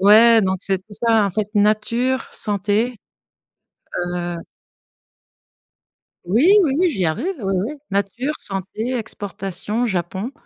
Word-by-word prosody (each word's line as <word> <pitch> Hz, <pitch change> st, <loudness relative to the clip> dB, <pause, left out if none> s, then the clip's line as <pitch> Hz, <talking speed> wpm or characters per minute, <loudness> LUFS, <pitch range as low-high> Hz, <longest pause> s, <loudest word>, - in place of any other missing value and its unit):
Ouais, 220 Hz, +3 st, +7 dB
donc 190 Hz, -1 st, +1 dB
c'est 195 Hz, -1 st, 0 dB
tout 205 Hz, +3 st, -19 dB
ça, 225 Hz, -1 st, +3 dB
en -, -, -2 dB
fait: 210 Hz, +2 st, -2 dB
nature, 230 Hz, +5 st, +1 dB
santé, 210 Hz, +4 st, 0 dB, 1.2 s
heu 175 Hz, 0 st, -3 dB, 1.9 s
Oui 225 Hz, -, +3 dB, 0.2 s
oui, 330 Hz, +4 st, +2 dB
j'y 190 Hz, -, -1 dB
arrive, 240 Hz, -, -1 dB
oui 195 Hz, -1 st, -1 dB
oui. 275 Hz, -, -4 dB, 0.2 s
Nature, 200 Hz, +9 st, -1 dB
santé, 200 Hz, +5 st, -3 dB
exportation, 205 Hz, +1 st, -4 dB
Japon. 190 Hz, +3 st, -2 dB
210 Hz, 115 wpm, -21 LUFS, 195-235 Hz, 1.9 s, Ouais